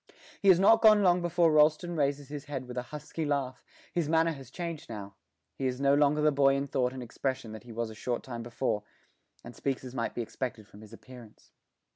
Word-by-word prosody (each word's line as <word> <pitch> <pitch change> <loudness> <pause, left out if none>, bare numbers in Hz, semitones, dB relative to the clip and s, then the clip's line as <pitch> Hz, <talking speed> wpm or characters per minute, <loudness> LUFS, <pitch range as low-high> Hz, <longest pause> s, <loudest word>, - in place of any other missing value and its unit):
He 200 - 0
has 185 -2 +7
not 225 +4 +6
gone 215 -2 +7
long 180 -1 +4
before 175 -1 +2
Rolleston 155 +3 +3
raises 140 -2 0
his 145 -1 -7
head 135 -4 -5
with 125 - -8
a 125 - -1
husky 150 +2 -5
laugh: 140 -4 -2 0.3
his 170 -4 -1
manner 165 +1 +3
has 135 -5 -9
changed 170 +1 -6
now; 100 -3 -7 0.4
he 135 - -2
is 125 0 -3
no 140 0 +3
longer 145 +1 +3
the 150 0 +4
boy 135 -1 +4
in 140 0 -1
thought 130 -2 0
and 130 -1 -7
expression 120 -1 -4
that 110 +1 -10
he 120 - -10
was 115 0 -3
a - - -9
short 120 +2 -3
time 120 -3 -6
before, 120 -2 -2 0.6
and 120 0 -10
speaks 135 +1 -2
as 130 -1 -8
might 115 -3 -3
be 120 - -2
expected 115 -2 -5
from 105 - -15
his 110 -1 -14
appearance. 120 -1 -14
135 Hz, 225 wpm, -29 LUFS, 120-155 Hz, 0.6 s, has